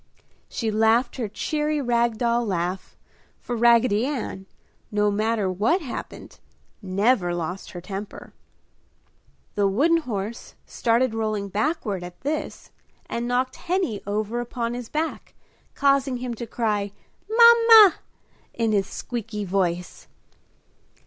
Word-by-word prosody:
She 225 -2 -2
laughed 225 +5 +2
her 235 -4 -2
cheery 300 +7 -2
rag 235 -3 +1
doll 235 +1 +1
laugh, 185 -2 -3 0.4
for 245 - -5
Raggedy 235 -2 +4
Ann, 240 -8 -4 0.4
no 210 0 +1
matter 215 0 0
what 225 - +1
happened, 255 - -8 0.4
never 195 -1 +1
lost 175 +3 -5
her 175 - -7
temper. 195 +3 -8 1.2
The 205 -1 +2
wooden 290 +13 +3
horse 225 -7 -5
started 235 +1 +1
rolling 215 -2 -2
backward 210 - -2
at 175 0 -10
this 295 +3 -4 0.3
and 235 +1 -3
knocked 255 +1 -1
Henny 355 - -1
over 215 +3 -2
upon 240 -1 -3
his 245 -1 -6
back, 315 +2 -4 0.4
causing 275 -2 +2
him 245 0 -4
to 235 +1 -7
cry 210 -4 -1 0.4
"Mama!" 460 -3 +8 0.6
in 225 -2 0
his 200 -2 +1
squeeky 225 -3 -5
voice. 180 -2 -2
230 Hz, 120 wpm, -24 LUFS, 205-255 Hz, 1.2 s, Mama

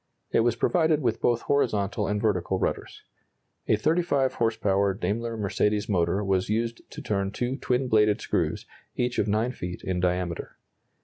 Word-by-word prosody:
It - - +3
was 115 0 +2
provided 160 +3 +2
with 115 -2 0
both 120 -1 +1
horizontal 105 -6 0
and 105 +1 0
vertical 95 -3 0
rudders. - - -3 0.6
A - - +4
35 150 +1 +1
horse 115 -1 0
power 100 -1 +1
Daimler 115 +5 -2
Mercedes 105 0 0
motor 95 0 +1
was 95 -1 0
used 115 +2 -1
to - - -9
turn 100 -2 -1
two 120 +5 -2
twin 130 -1 0
bladed 105 -3 +3
screws, - - -1 0.3
each 125 0 -1
of - - +1
9 110 +4 +1
feet 90 -7 -6
in 90 -1 -1
diameter. 90 -1 -2
105 Hz, 165 wpm, -26 LUFS, 95-120 Hz, 0.6 s, A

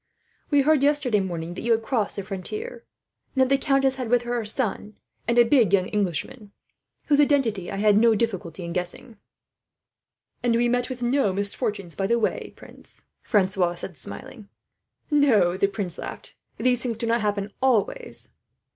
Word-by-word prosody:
"We 285 -2 +4
heard 305 -1 +4
yesterday 280 -6 +3
morning 175 -3 -4
that - - -6
you 235 0 +2
had 225 0 0
crossed 225 -3 -1
the 200 - -4
frontier, 425 - -6 0.5
and 265 - +3
that 260 - 0
the 275 0 +2
countess 270 -1 +2
had 250 -3 -4
with 245 0 +3
her 240 0 -3
her 235 -2 -1
son, 210 -2 -3 0.3
and 235 +1 +1
a 240 - +8
big 230 -6 +3
young 185 -2 +4
Englishman, 205 +2 -3 0.5
whose 290 -1 +3
identity 240 - +1
I - - -4
had 205 +1 +4
no 230 0 +5
difficulty 190 -6 -2
in 170 0 -5
guessing." 185 +6 -5 1.2
"And 240 -1 +2
we 240 +1 +3
met 245 +1 0
with 250 -1 -5
no 245 -3 +2
misfortunes 200 -2 -2
by 195 - -1
the 235 +2 +2
way, 225 - -1
prince," - - -9 0.2
Francois 185 -3 +1
said, 175 0 -7
smiling. 230 - -8 0.6
"No," 235 -12 +4
the 200 - +2
prince 195 -4 -4
laughed, - - -8 0.2
"these 250 -1 +1
things 235 -3 -1
do 230 - -3
not 230 0 +1
happen 205 -1 -1
always." 265 - +1
225 Hz, 175 wpm, -25 LUFS, 195-255 Hz, 1.2 s, a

